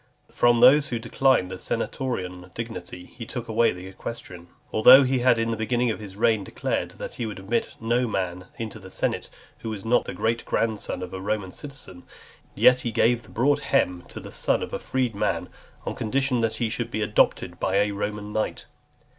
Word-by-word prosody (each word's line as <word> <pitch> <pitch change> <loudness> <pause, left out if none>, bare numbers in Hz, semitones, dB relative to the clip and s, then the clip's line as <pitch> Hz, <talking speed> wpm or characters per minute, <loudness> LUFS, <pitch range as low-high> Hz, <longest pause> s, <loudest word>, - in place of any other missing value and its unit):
From 120 -1 +3
those 140 +4 +7
who 120 - -2
declined 115 -4 +2
the 95 - -6
senatorian 95 -8 -3
dignity, 90 -6 -6
he 115 - -7
took 120 +1 -6
away 115 +1 +3
the 90 +1 -8
equestrian. 95 -2 -8 0.3
Although 125 +5 +9
he 130 0 +1
had 120 -1 +4
in 115 0 0
the - - 0
beginning 120 +2 +1
of - - -5
his 100 -3 -9
reign 110 -1 +2
declared, - - -3
that - - -6
he 115 - -3
would 105 - -6
admit 105 +5 -2
no 120 +2 +1
man 90 -3 -3
into 110 -1 -5
the 95 -1 -11
senate - - -2 0.3
who 115 - -5
was 105 -2 -6
not 120 +2 +3
the - - -6
great 115 +1 0
grandson 110 -4 -1
of 90 0 -7
a 95 - -5
Roman 100 -1 -2
citizen, 135 -11 -9 0.5
yet 125 0 +6
he 120 - -2
gave 115 +2 +3
the - - -18
"broad 145 +4 +2
hem" 90 -11 +1
to - - -8
the - - -10
son - - 0
of - - -7
a - - -2
freedman, 125 -6 -1 0.4
on - - -2
condition 130 +2 0
that 115 -1 0
he 120 - 0
should 115 +1 -3
be 110 -2 -2
adopted 105 0 +1
by 95 - 0
a 105 +1 +3
Roman 105 +1 -4
knight. 110 - -2
115 Hz, 200 wpm, -25 LUFS, 100-120 Hz, 0.5 s, Although